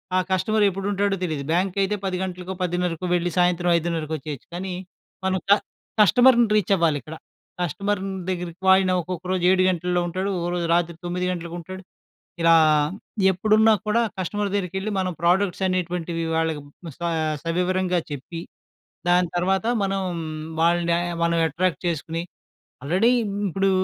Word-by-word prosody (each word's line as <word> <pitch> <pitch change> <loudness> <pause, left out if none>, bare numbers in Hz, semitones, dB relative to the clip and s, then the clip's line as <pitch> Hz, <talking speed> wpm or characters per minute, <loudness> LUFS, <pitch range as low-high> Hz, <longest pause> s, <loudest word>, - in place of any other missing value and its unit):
ఆ - - +4
కస్టమర్ 210 +3 +2
ఎప్పుడు 195 +1 -4
ఉంటాడో 200 0 +1
తెలీదు. 155 -5 -2
బ్యాంక్ 180 +2 +1
అయితే 200 +2 +1
10 185 -1 -1
గంటలకో, 185 0 -5
పదిన్నరకో 180 0 -1
వెళ్లి 175 0 0
సాయంత్రం 175 0 +2
ఐదున్నరకి 165 -2 -2
వచ్చేయొచ్చు. 145 -2 -8
కానీ 185 0 -4 0.5
మనం 190 0 +1
క - - +9 0.5
కస్టమర్‌ని 240 +3 +6
రీచ్ 205 -2 +1
అవ్వాలి 165 -5 +2
ఇక్కడ. 160 +1 -9 0.5
కస్టమర్ 200 +4 -1 0.3
దగ్గరకి 180 0 -4
ఆయన 190 -1 +2
ఒక్కొక్క 180 +1 -6
రోజు 185 -2 0
7 185 0 +4
గంటల్లో 180 0 0
ఉంటాడు, 185 +3 -2
ఒక 170 - -2
రోజు 175 -1 -1
రాత్రి 170 -1 +1
9 180 +1 -2
గంటలకు 170 -1 -5
ఉంటాడు. 185 +3 -8 0.6
ఇలా 165 0 +6 0.8
ఎప్పుడున్నా 215 +4 +4
కూడా 230 +3 +3 0.2
కస్టమర్ 205 +3 -2
దగ్గరికెళ్లి 190 +1 -2
మనం 185 -1 0
ప్రోడక్ట్స్ 185 +2 +2
అనేటువంటివి 175 -2 -2
వాళ్ళకి 160 -2 0 0.4
స - - -41 0.4
సవివరంగా 180 +1 0
చెప్పి, 145 +4 -6 0.7
దాని 180 0 +4
తర్వాత 190 +3 +1 0.2
మనం, 195 0 -1 0.6
వాళ్ళని 170 0 +3 0.3
మనం 170 0 +2
అట్రాక్ట్ 175 +3 -1
చేసుకొని, 165 +1 -2 0.6
ఆల్రెడీ 185 +11 +3
ఇ - - -1 0.3
ఇప్పుడు 195 +3 +1
180 Hz, 145 wpm, -23 LUFS, 170-190 Hz, 0.8 s, క